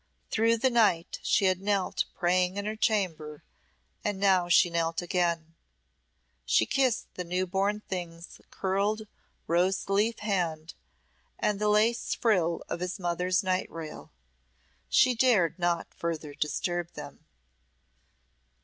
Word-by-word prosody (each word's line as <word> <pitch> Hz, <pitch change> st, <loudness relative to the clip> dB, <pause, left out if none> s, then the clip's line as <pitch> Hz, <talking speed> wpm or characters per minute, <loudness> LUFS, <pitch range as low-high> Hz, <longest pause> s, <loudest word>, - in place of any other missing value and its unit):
Through 230 Hz, +1 st, +3 dB
the 260 Hz, +3 st, +2 dB
night 205 Hz, -8 st, +2 dB
she 205 Hz, -, +2 dB
had 185 Hz, 0 st, +2 dB
knelt 200 Hz, -2 st, 0 dB
praying 180 Hz, +1 st, +1 dB
in 200 Hz, -, -3 dB
her 215 Hz, +1 st, -2 dB
chamber, 180 Hz, -, -1 dB, 0.6 s
and 205 Hz, -2 st, -2 dB
now 190 Hz, -3 st, +3 dB
she 175 Hz, 0 st, +5 dB
knelt 165 Hz, -1 st, 0 dB
again. 170 Hz, -2 st, -1 dB, 0.9 s
She 65 Hz, -, +3 dB
kissed 260 Hz, -, 0 dB
the 180 Hz, -, -5 dB
new 180 Hz, +2 st, -1 dB
born 200 Hz, +3 st, -1 dB
thing's 175 Hz, -3 st, -7 dB
curled 200 Hz, +3 st, -1 dB, 0.4 s
rose 180 Hz, +3 st, +1 dB
leaf 210 Hz, +4 st, +1 dB
hand 170 Hz, -6 st, -2 dB, 0.6 s
and 210 Hz, -1 st, 0 dB
the 210 Hz, -, +2 dB
lace 215 Hz, +3 st, +2 dB
frill 180 Hz, -7 st, +1 dB
of -, -, -4 dB
his 180 Hz, +2 st, -3 dB
mother's 180 Hz, +2 st, 0 dB
night 185 Hz, 0 st, 0 dB
rail. 160 Hz, -2 st, -8 dB, 0.8 s
She 255 Hz, -1 st, +5 dB
dared 225 Hz, -9 st, +2 dB
not 175 Hz, -1 st, -1 dB
further 160 Hz, -3 st, -4 dB
disturb 175 Hz, +4 st, -2 dB
them. -, -, -10 dB
185 Hz, 130 wpm, -28 LUFS, 170-210 Hz, 0.9 s, she